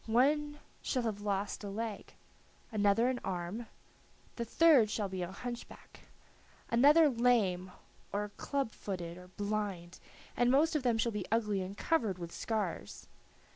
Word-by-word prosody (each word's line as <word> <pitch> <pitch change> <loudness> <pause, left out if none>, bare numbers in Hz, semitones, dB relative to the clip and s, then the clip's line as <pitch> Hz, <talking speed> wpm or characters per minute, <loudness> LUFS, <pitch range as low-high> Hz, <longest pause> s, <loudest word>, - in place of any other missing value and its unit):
One 295 +6 +2 0.2
shall 255 -3 -1
have 215 -3 -2
lost 200 0 -2
a 200 - -4
leg, 215 +1 -5 0.6
another 210 +2 +3
an 255 -1 0
arm, 190 +5 -4 0.7
the 235 - -2
third 265 -2 +5
shall 210 -1 -1
be 185 -1 -4
a 175 +1 -3
hunchback, 240 +4 -8 0.7
another 295 +7 +7
lame 225 -8 +2 0.4
or 205 +1 -2
club 275 +3 -2
footed 175 -6 -5
or 180 0 -12
blind, 200 -3 -3 0.4
and 245 0 +3
most 305 +5 +4
of 305 - +2
them 240 -3 +2
shall 230 +1 +1
be 210 -4 -4
ugly 210 -4 +1
and 190 +2 -6
covered 225 - +1
with 170 -1 -7
scars. 200 - -3
215 Hz, 145 wpm, -33 LUFS, 195-245 Hz, 0.7 s, another